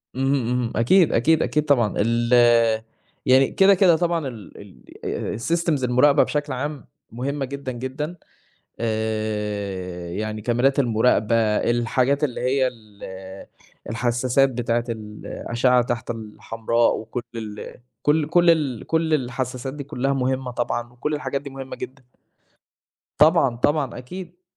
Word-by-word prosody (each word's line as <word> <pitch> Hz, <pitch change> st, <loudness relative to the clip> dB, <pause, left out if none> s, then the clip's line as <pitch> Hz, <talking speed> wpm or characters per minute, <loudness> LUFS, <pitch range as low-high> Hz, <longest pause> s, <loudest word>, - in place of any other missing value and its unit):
اهم، 130 Hz, -, -3 dB, 0.4 s
اهم، 115 Hz, -, -3 dB
أكيد، 160 Hz, -, +4 dB
أكيد، 160 Hz, +7 st, +3 dB
أكيد، 150 Hz, 0 st, 0 dB
طبعًا 120 Hz, -8 st, +2 dB
ال 115 Hz, +2 st, +1 dB, 0.9 s
يعني 130 Hz, +1 st, +5 dB
كده 195 Hz, +1 st, +5 dB
كده 180 Hz, -3 st, +5 dB
طبعًا 170 Hz, -3 st, 0 dB
ال 115 Hz, -5 st, -10 dB, 0.5 s
ال -, -, -3 dB
الsystems 165 Hz, 0 st, 0 dB
المراقبة 125 Hz, +4 st, +4 dB
بشكل 145 Hz, -2 st, -2 dB
عام 145 Hz, 0 st, -5 dB, 0.2 s
مهمة 135 Hz, +4 st, -3 dB
جدًا، 140 Hz, -1 st, -5 dB
جدًا، 130 Hz, +7 st, -5 dB, 0.6 s
آآ، 105 Hz, -5 st, -3 dB
يعني 110 Hz, +3 st, -4 dB
كاميرات 125 Hz, +5 st, +2 dB
المراقبة 115 Hz, -2 st, +2 dB, 0.2 s
الحاجات 125 Hz, +4 st, +1 dB
اللي 130 Hz, -5 st, -1 dB
هي 130 Hz, +1 st, +2 dB
ال 110 Hz, -4 st, -12 dB, 0.9 s
الحساسات 125 Hz, +4 st, +2 dB
بتاعة 120 Hz, -1 st, -1 dB
الأشعة 115 Hz, +3 st, -1 dB
تحت 120 Hz, -1 st, -3 dB
الحمراء 115 Hz, +1 st, -1 dB
وكُل 115 Hz, +2 st, -5 dB
ال 105 Hz, -2 st, -7 dB, 0.3 s
كُل 150 Hz, 0 st, +2 dB
كُل 175 Hz, +1 st, +4 dB
ال 145 Hz, -8 st, +1 dB
كُل 160 Hz, -1 st, +1 dB
الحساسات 130 Hz, -1 st, -2 dB
دي 145 Hz, -1 st, -6 dB
كُلها 140 Hz, -1 st, -1 dB
مهمة 130 Hz, -1 st, -1 dB
طبعًا، 120 Hz, 0 st, -3 dB
وكُل 150 Hz, +5 st, -3 dB
الحاجات 140 Hz, -2 st, -3 dB
دي 140 Hz, -, -8 dB
مهمة 135 Hz, -1 st, -7 dB
جدًا. 135 Hz, 0 st, -8 dB, 1.2 s
طبعًا، 150 Hz, -4 st, +5 dB
طبعًا، 140 Hz, +1 st, 0 dB
أكيد. 175 Hz, +7 st, -9 dB
125 Hz, 125 wpm, -23 LUFS, 115-145 Hz, 1.2 s, يعني